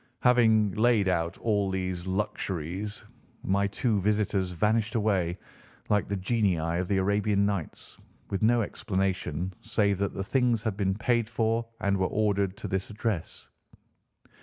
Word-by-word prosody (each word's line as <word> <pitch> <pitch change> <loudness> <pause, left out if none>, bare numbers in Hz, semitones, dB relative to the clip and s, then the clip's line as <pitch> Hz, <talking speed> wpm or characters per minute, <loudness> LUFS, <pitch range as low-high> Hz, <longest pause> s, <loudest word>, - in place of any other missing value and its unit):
Having 110 -4 +4
laid 110 0 +3
out 85 -1 0
all 105 -4 0
these 95 -1 -3
luxuries, 95 -1 -3 0.4
my 100 +1 +1
two 105 +1 0
visitors 100 -2 +1
vanished 105 +5 0
away, 95 -6 +1 0.5
like 105 -1 +2
the 100 - -2
genii 100 -1 +1 0.2
of 90 - -2
the 100 - +1
Arabian 100 +1 +2
Nights, 100 -6 -4 0.3
with 100 - -1
no 115 +1 +4
explanation 95 -4 -2
save 105 -4 +1
that 100 0 -1
the 95 - -2
things 120 0 +1
had 110 -4 -1
been 95 -2 0
paid 115 0 +1
for 115 0 0
and 100 0 +1
were 95 -1 +1
ordered 100 -2 0
to - - -5
this 95 0 -2
address. 105 -5 -3
100 Hz, 145 wpm, -28 LUFS, 95-110 Hz, 0.5 s, Having